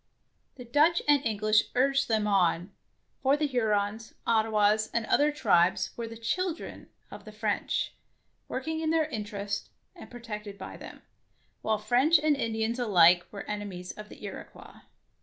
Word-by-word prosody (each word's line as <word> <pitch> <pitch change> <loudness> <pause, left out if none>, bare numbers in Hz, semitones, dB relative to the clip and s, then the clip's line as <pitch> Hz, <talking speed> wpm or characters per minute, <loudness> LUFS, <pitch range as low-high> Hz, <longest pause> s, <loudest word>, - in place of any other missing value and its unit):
The 250 - -10
Dutch 300 +8 +3
and 290 -1 +4
English 215 -1 +2
urged 275 +1 +2
them 220 -2 +1
on, 185 -2 +1 0.5
for 275 +2 +3
the 300 - 0
Hurons, 220 -4 -1
Ottawas, 215 -1 +2
and 235 -1 +1
other 290 +6 +3
tribes 190 - +2
were 235 -1 -5
the 230 0 -9
"children'' 340 +9 -3 0.2
of 205 - -10
the 215 - -11
French, 210 -1 -2 0.5
working 315 +5 -3
in 320 -1 -1
their 320 -1 +2
interests 205 -6 -4 0.3
and - - -12
protected 210 -4 -8
by 190 - -8
them, - - -11 0.6
while 220 0 0
French 245 +10 +4
and 300 0 +2
Indians 225 -1 -2
alike 175 -6 +5
were 200 -1 -7
enemies 200 -4 -6
of 210 0 -11
the - - -13
Iroquois. - - -10
220 Hz, 150 wpm, -28 LUFS, 205-265 Hz, 0.6 s, alike